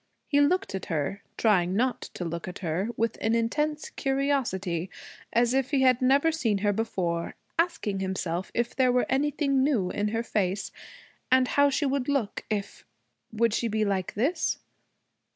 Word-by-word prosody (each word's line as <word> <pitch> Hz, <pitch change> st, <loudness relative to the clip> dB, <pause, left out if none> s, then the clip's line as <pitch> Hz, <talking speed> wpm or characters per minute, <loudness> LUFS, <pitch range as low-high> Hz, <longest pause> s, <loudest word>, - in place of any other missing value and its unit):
He 285 Hz, -1 st, +3 dB
looked 360 Hz, -, +2 dB
at 190 Hz, -, -4 dB
her, 165 Hz, +5 st, -2 dB, 0.2 s
trying 185 Hz, -5 st, +3 dB
not 250 Hz, +4 st, +1 dB
to 175 Hz, -, -4 dB
look 170 Hz, +1 st, -4 dB
at 180 Hz, -, -6 dB
her, 175 Hz, +7 st, -1 dB
with 230 Hz, 0 st, -1 dB
an 225 Hz, +1 st, +2 dB
intense 300 Hz, +7 st, -1 dB
curiosity, 245 Hz, -, -1 dB, 0.4 s
as 240 Hz, +1 st, +3 dB
if 265 Hz, -1 st, +1 dB
he 275 Hz, -2 st, +2 dB
had 255 Hz, -1 st, +4 dB
never 275 Hz, +5 st, +4 dB
seen 240 Hz, -10 st, 0 dB
her 205 Hz, -, +3 dB
before, 180 Hz, -6 st, -2 dB, 0.2 s
asking 220 Hz, -, 0 dB
himself 190 Hz, -2 st, -2 dB
if 235 Hz, 0 st, -1 dB
there 255 Hz, -2 st, +4 dB
were 250 Hz, 0 st, +2 dB
anything 275 Hz, 0 st, +1 dB
new 235 Hz, -11 st, +1 dB
in 205 Hz, +1 st, -1 dB
her 225 Hz, +2 st, -1 dB
face, 195 Hz, -3 st, -1 dB, 0.6 s
and 255 Hz, -1 st, +4 dB
how 285 Hz, 0 st, +4 dB
she 285 Hz, +2 st, 0 dB
would 275 Hz, -1 st, 0 dB
look 260 Hz, -8 st, -1 dB
if 205 Hz, -2 st, -3 dB, 0.5 s
Would 230 Hz, 0 st, +1 dB
she 235 Hz, -, 0 dB
be 215 Hz, -1 st, 0 dB
like 190 Hz, -3 st, -1 dB
this? 275 Hz, -, 0 dB
230 Hz, 170 wpm, -27 LUFS, 195-270 Hz, 0.6 s, had